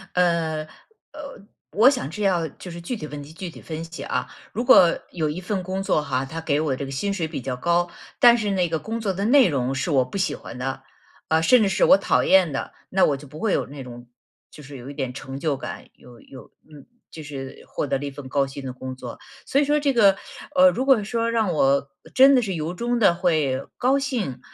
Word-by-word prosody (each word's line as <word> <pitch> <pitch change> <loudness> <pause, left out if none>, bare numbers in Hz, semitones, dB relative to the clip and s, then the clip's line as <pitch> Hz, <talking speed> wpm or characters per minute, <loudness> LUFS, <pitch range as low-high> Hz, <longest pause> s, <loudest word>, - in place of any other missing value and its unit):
呃， 170 -3 +1 0.5
呃， 280 -9 -10 0.3
我 225 +6 +6
想 255 - -2
这 205 +7 -5
要 175 -4 +1
就 175 +4 -11
是 170 - -8
具 175 +9 -4
体 165 - -7
问 150 -1 -7
题 145 +2 -12
具 185 +1 -6
体 - - -13
分 160 0 -6
析 165 +1 -9
啊。 - - -2 0.3
如 235 - -2
果 175 -8 +6
有 160 -4 -1
一 160 +5 -5
份 190 +1 -2
工 190 +1 -4
作 155 - +1
哈， 135 -3 -2
它 160 +4 -6
给 150 -2 0
我 150 -4 0
这 140 - -5
个 135 - -7
薪 200 +9 -2
水 170 -5 -2
比 155 -4 -6
较 130 0 -3
高， 175 +5 +1 0.3
但 240 -1 +7
是 210 -3 -2
那 180 -3 +1
个 160 -1 -1
工 225 +5 -5
作 205 -3 0
的 195 +2 -2
内 255 +2 +6
容 135 -3 -1
是 150 +5 -2
我 130 -3 +3
不 130 - -6
喜 195 - 0
欢 120 - -9
的， 135 +1 -4 0.4
啊， 160 0 +2
甚 240 +9 +5
至 210 - +3
是 195 - +1
我 - - +7
讨 195 - +1
厌 185 -6 +4
的， 135 - -4 0.2
那 190 0 +2
我 140 - +1
就 145 +1 -13
不 150 +3 -11
会 215 +3 0
有 - - +1
那 140 0 -9
种 120 -1 -11 0.4
就 150 - -13
是 140 0 -10
有 125 +2 -9
一 - - -7
点 135 -3 -4
成 135 0 -7
就 145 -1 -1
感， 155 +3 -8
有 120 -2 -16
有 130 - -14
嗯， 150 -3 -15 0.3
就 160 - -9
是 135 -3 -8
获 - - -3
得 135 - 0
了 145 - -5
一 140 - -4
份 135 -1 -10
高 140 0 +1
薪 135 +1 -8
的 130 - -4
工 130 +1 -7
作。 125 -2 -9 0.3
所 275 - +1
以 290 - +3
说 295 +1 +2
这 285 -1 +2
个， 205 -5 +5 0.4
呃， 275 0 +7
如 260 -1 -2
果 265 -6 +4
说 230 +2 -1
让 225 -5 +1
我 140 -1 +2 0.2
真 270 +1 +7
的 255 - +4
是 200 -5 -3
由 160 +1 -3
衷 240 +6 -1
地 195 -6 +5
会 155 -7 0
高 265 +3 +2
兴， 230 - -3
165 Hz, 265 characters per minute, -23 LUFS, 140-200 Hz, 0.5 s, 但